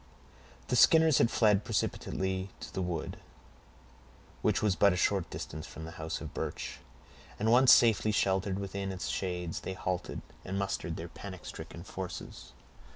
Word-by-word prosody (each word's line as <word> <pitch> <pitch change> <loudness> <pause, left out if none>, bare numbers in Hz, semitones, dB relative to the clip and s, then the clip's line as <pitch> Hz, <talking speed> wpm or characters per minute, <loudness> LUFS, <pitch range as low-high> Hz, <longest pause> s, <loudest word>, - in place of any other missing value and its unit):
The 125 - +2
Skinners 160 +3 +6
had 115 - +4
fled 105 -4 +3
precipitately 95 0 -2
to - - -8
the 95 - -2
wood, 85 -3 -3 1.2
which - - +1
was 105 -3 +3
but 100 +1 +5
a - - -2
short 95 -1 +1
distance 80 0 -6
from 80 - -8
the 80 - -7
house 80 +1 -3
of - - -7
Birch, - - -4 0.6
and 110 +2 +1
once 125 +2 +7
safely 110 -2 +5
sheltered 95 -1 +1
within 100 0 -3
its 95 -1 -4
shades, 90 -3 -2
they 95 - -5
halted, 90 -1 -3 0.2
and 95 +1 -3
mustered 95 -4 -2
their 85 - -6
panic 95 +1 -9
stricken 85 - -8
forces. 95 -1 -7
95 Hz, 160 wpm, -31 LUFS, 90-105 Hz, 1.2 s, once